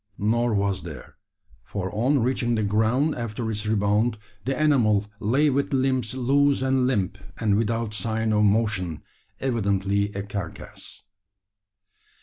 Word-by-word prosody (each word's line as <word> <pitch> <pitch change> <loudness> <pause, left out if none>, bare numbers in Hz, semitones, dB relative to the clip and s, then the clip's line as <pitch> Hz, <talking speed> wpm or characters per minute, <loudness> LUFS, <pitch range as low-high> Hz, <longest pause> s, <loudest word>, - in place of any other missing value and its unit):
Nor 115 +2 +1
was 100 -1 0
there; - - -10 0.5
for 95 -1 -5
on 125 +4 +2
reaching 120 -1 0
the 110 - 0
ground 110 +9 +2
after 115 -1 -4
its 105 0 -4
rebound, 105 +2 +1 0.3
the 135 +1 -1
animal 115 -9 +3
lay 140 +8 +2
with 140 +1 0
limbs 130 -3 0
loose 140 +2 +2
and 130 -1 +2
limp, 100 -6 -1 0.2
and 105 -3 +2
without 115 0 -1
sign 110 +2 -1
of 105 0 +3
motion 105 -6 +1 0.4
evidently 100 -5 0
a 100 - -3
carcass. 100 -4 -8
110 Hz, 130 wpm, -25 LUFS, 100-130 Hz, 0.5 s, animal